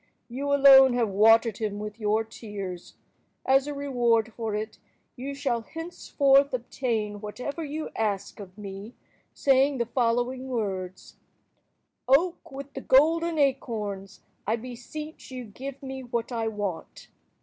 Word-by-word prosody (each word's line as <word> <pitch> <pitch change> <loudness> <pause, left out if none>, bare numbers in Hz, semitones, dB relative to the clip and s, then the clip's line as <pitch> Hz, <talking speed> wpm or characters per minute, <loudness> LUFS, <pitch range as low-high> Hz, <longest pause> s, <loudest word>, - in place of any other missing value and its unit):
You 275 +4 -3
alone 270 -2 +8
have 240 -3 +1
watered 225 +2 +5
him 210 -2 -2
with 210 +1 -6
your 215 +1 +1
tears. 200 -5 -8 0.5
As 270 +1 +4
a 295 - -3
reward 240 -5 +1
for 225 -3 -3
it, 215 +1 -5 0.4
you 275 +2 -5
shall 265 -5 -1
henceforth 280 -2 +1
obtain 225 -4 -3
whatever 250 +9 -5
you 305 +1 -5
ask 210 -3 -2
of 190 -1 -11
me, 200 +2 -8 0.4
saying 270 0 +3
the 235 - 0
following 245 +2 0
words:— 190 -6 -4 0.9
"Oak 330 +7 +2
with 275 +1 -8
the 270 - -6
golden 325 +5 +3
acorns, 210 -9 -1 0.3
I 220 - +2
beseech 255 +6 -8
you 255 -2 -6
give 265 +6 -8
me 265 0 -6
what 240 -1 -3
I 230 -2 -1
want!" 205 -5 -5
240 Hz, 135 wpm, -27 LUFS, 215-275 Hz, 0.9 s, alone